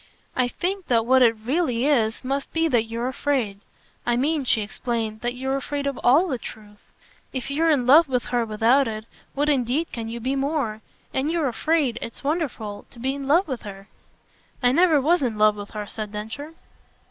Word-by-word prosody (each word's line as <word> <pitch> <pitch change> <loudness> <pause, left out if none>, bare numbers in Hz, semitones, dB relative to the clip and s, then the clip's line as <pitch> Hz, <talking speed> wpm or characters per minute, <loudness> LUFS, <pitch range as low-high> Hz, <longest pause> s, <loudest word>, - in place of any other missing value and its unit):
"I 255 -1 +2
think 370 +8 -3
that 230 -2 +2
what 260 +2 +5
it 230 -2 +5
really 250 +2 0
is 235 -6 +1
must 275 +2 -2
be 325 0 +2
that 240 -7 +2
you're 230 +2 -3
afraid. 255 -6 -1 0.4
I 240 - +1
mean," 290 +2 +1
she 225 - +2
explained, 220 0 -3
"that 240 +1 -2
you're 265 +2 -2
afraid 280 +1 -3
of 280 -2 -2
ALL 295 +10 +5
the 260 -7 -2
truth. 210 -2 -11 0.5
If 260 +1 -4
you're 325 +4 +2
in 280 -6 +3
love 295 +4 +7
with 250 -2 0
her 240 -1 +3
without 230 +5 +3
it, 215 -1 -5 0.3
what 290 +2 +1
indeed 280 +3 +1
can 225 -2 -5
you 235 +1 -5
be 260 +4 -1
more? 270 -6 -1 0.3
And 270 +3 0
you're 325 -3 +1
afraid 265 -1 0
it's 230 - -8
wonderful! 275 -9 -3
to - - -16
be 260 +3 -1
in 275 -1 -6
love 335 +6 +4
with 260 -5 -4
her." 195 0 -10 0.7
"I 245 - +5
never 325 +1 +4
was 325 +5 +3
in 235 -5 -1
love 210 0 +5
with 205 0 -8
her," 210 -1 -5
said 210 0 -6
Densher. 225 +10 -6
255 Hz, 200 wpm, -24 LUFS, 225-290 Hz, 0.7 s, love